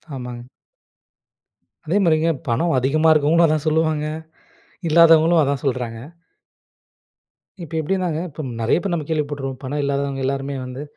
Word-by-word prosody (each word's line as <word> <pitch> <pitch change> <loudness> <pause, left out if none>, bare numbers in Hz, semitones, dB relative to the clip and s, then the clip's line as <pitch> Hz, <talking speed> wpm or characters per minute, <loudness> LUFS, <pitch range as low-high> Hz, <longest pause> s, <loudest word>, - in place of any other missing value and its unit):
ஆமாங்க. 125 -2 -7 1.5
அதேமாதிரிங்க. 165 -3 +2 0.2
பணம் 130 +8 +1
அதிகமா 155 +5 +3
இருக்கிறவங்களும் 155 +2 +4
அதான் 155 -1 -1
சொல்லுவாங்க. 155 -1 +1 0.8
இல்லாதவங்களும் 165 +1 +5
அதான் 140 -2 -1
சொல்றாங்க. 125 -4 -2 1.7
இப்ப 165 - -10
எப்படின்னாங்க 175 0 -1
இப்போ 155 +1 -8 0.2
நெறைய 115 - +2
பேர் 195 -3 -2
நம்ம 160 -3 -2
கேள்விப்பட்டுருக்கோம். 145 -4 -3
பணம் 145 +3 -3
இல்லாதவங்க 140 -1 -2
எல்லாருமே 140 +1 -2
வந்து 125 +3 -7
150 Hz, 115 wpm, -21 LUFS, 135-160 Hz, 1.7 s, இல்லாதவங்களும்